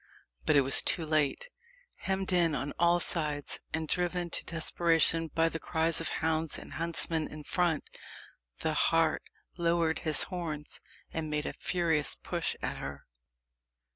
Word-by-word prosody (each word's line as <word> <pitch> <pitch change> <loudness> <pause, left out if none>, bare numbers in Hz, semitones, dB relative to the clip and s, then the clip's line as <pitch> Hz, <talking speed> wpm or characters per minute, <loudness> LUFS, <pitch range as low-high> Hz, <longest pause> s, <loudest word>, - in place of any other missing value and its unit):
But - - +4
it 140 - +7
was 135 0 +5
too 165 - +1
late. 155 - 0 0.5
Hemmed 190 -1 -1
in 170 -3 +3
on 140 +2 -3
all 170 +1 +4
sides, 150 -4 0
and 160 -1 -2
driven 175 0 -1
to - - +1
desperation 165 0 +2
by 165 +1 +1
the 165 0 -3
cries 160 0 +2
of 165 - -3
hounds 160 -1 -1
and - - -10
huntsmen 165 -1 -1
in 150 0 -9
front, 170 +1 0 0.8
the - - 0
hart - - +2 0.4
lowered 170 -1 +1
his 155 -3 +5
horns, 160 -5 -5 0.3
and 160 -1 -3
made 150 0 -1
a - - -3
furious 165 -5 0
push - - -2
at - - -2
her. 70 0 -7
165 Hz, 150 wpm, -30 LUFS, 155-170 Hz, 0.8 s, it